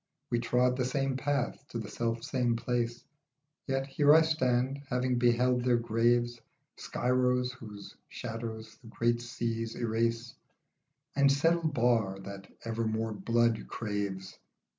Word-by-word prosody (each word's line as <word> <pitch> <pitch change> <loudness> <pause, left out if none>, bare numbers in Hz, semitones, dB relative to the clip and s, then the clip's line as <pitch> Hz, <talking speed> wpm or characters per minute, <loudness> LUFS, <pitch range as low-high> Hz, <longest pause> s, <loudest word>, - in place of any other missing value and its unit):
We 120 - +2
trod 125 +1 +2
the 125 - 0
same 135 +1 0
path, 140 0 -1
to - - -6
the 110 -3 -4
self 115 +1 -2
same 120 -3 0
place, 120 0 -2 0.6
Yet 135 0 0
here 145 +2 +5
I 160 - +7
stand, 130 -3 +1
having 125 0 +1
beheld 125 +1 +3
their 125 -1 +3
graves, 120 +1 +1 0.3
Skyros 125 0 +1
whose 105 -5 -10
shadows 115 -1 -6
the 120 - -14
great 120 +1 0
seas 115 -2 -3
erase, 115 +1 -1 0.8
And 140 0 +5
Sedd 145 +4 +3
el 170 -1 0
Bahr 115 -7 +2
that 100 0 -9
ever 115 0 -1
more 110 0 -1
blood 115 +3 +1
craves. 100 -3 -4
120 Hz, 140 wpm, -30 LUFS, 115-125 Hz, 0.8 s, I